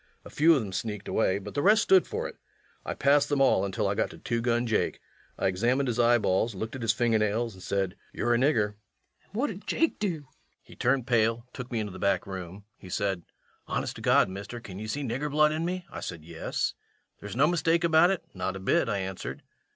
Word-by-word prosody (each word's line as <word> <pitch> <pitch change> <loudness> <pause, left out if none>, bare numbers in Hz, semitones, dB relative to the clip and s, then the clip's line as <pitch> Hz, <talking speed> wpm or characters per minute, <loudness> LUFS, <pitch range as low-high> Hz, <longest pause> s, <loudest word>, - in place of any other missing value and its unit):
A - - -10
few 165 +2 +5
of 135 - +1
them 100 -3 -7
sneaked 105 -1 -4
away, 95 -3 +1
but 100 - -8
the 145 - 0
rest 210 +5 +5
stood 380 -1 +5
for 470 +2 -3
it. - - -10 0.5
I - - -4
passed 145 +1 +3
them 145 -1 +1
all 135 -8 +4
until 100 +1 -1
I 100 - +1
got - - 0
to - - -11
Two 120 -1 -2
Gun 120 0 +1
Jake. 110 -2 0 0.4
I - - -2
examined 120 +9 +2
his 120 -1 -1
eyeballs, 115 -3 +3
looked 110 +6 -5
at 130 - -6
his 115 -2 +3
finger 115 +1 +2
nails, 110 +2 0
and 95 - -14
said, 95 -1 -1 0.2
"You're 120 - 0
a - - +4
nigger." 125 -6 +3
LUKE. 105 - -17 0.5
An' - - -33
what 250 +8 0
did 195 +1 -10
Jake 330 - +1
do? 205 - +1
REVENUE. 150 -4 -10 0.4
He - - -15
turned 130 0 +1
pale, 115 -1 +2
took 125 0 -7
me 115 - -1
into 105 -2 -3
the 95 - -9
back 100 -2 +1
room. 95 +1 -7 0.2
He 95 - -11
said: 95 -2 -1 0.5
"Honest - - -2
to - - -9
God, - - +4
mister, 100 +5 -7
can 100 -4 -9
ye 110 - -5
see 145 +6 -3
nigger 135 +4 -2
blood 150 +1 +4
in 160 +2 -1
me?" 180 0 -3
I - - -6
said: 80 -2 -7
"Yes." 85 -1 -2 0.5
"There's 100 -1 -7
no 135 +4 +5
mistake 165 0 +2
about 165 +1 +5
it?" 190 -3 -1
"Not 95 +1 -3
a - - -5
bit," 95 - +2
I 100 - 0
answered. 95 -1 -5
115 Hz, 240 wpm, -28 LUFS, 100-145 Hz, 0.5 s, few